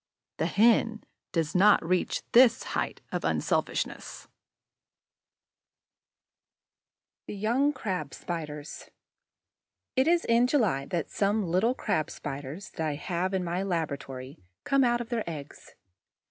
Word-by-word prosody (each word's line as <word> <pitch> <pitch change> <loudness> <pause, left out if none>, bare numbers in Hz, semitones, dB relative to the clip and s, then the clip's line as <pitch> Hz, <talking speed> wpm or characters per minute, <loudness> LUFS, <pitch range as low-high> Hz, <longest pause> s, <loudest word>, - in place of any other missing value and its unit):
The - - 0
Hen 225 0 +3 0.3
does 165 -3 -1
not 195 -1 +5
reach 180 0 0
this 240 -1 +6
height - - -3
of - - -2
unselfishness! - - -2 3.0
THE - - -5
YOUNG 240 +8 +1
CRAB 180 - -4
SPIDERS 150 -4 -6 1.1
It 260 +2 +3
is 345 0 +3
in 235 +1 +4
July 210 - +1
that 170 -3 -3
some 205 +1 +1
little 185 +9 +2
Crab 155 - -1
spiders 145 +6 -7
that 160 - 0
I 150 - -1
have 180 +5 -2
in 185 - 0
my 175 +1 -2
laboratory 140 - -4 0.2
come 275 -1 +3
out 240 -1 +2
of 230 - -7
their 235 -3 -1
eggs. 150 -3 -9
185 Hz, 120 wpm, -28 LUFS, 155-230 Hz, 3.0 s, this